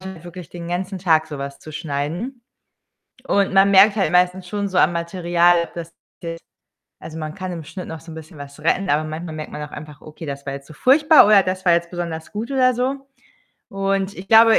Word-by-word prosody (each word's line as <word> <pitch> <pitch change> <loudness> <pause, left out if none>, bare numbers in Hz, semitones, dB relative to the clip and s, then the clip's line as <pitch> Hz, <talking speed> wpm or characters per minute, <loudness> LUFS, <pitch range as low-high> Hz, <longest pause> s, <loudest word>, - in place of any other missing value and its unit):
Wirklich 175 -3 -10
den 170 -1 -8
ganzen 185 +2 -3
Tag 160 -3 +2
so 150 -2 -7
was 140 0 -6
zu 155 - -11
schneiden. 165 - -4 0.8
Und 200 -1 +1
man 195 +1 +6
merkt 200 +2 +6
halt 195 - +1
meistens 180 +1 +2
schon 200 +2 -2
so 190 - -5
am 175 - +4
Material, 170 0 +2
dass 170 -1 -7
de - - -41 1.1
also, 160 - -8
man 155 -1 -5
kann 185 -1 -5
im 170 -3 -6
Schnitt 185 +4 -8
noch 160 -1 -7
so 165 0 -11
'n - - -9
bisschen 160 +1 -11
was 145 +1 -10
retten, 180 +5 +1
aber 150 +2 +2
manchmal 155 +1 -6
merkt 155 -1 -6
man 150 - -6
auch - - -16
einfach: 150 -1 -10
„Okay, 155 +1 -10
das 140 -1 -6
war 135 - -4
jetzt 140 0 -8
so 155 - -13
furchtbar 300 - +6
oder 205 -2 +6
das 185 0 -3
war 175 - +5
jetzt 170 0 +1
besonders 170 -2 -5
gut“, 220 +5 -5
oder 255 -2 +3
so. 270 +3 -2 0.6
Und 195 0 -1
ich 185 - -9
glaube, 225 +1 +7
175 Hz, 220 wpm, -21 LUFS, 155-195 Hz, 1.1 s, glaube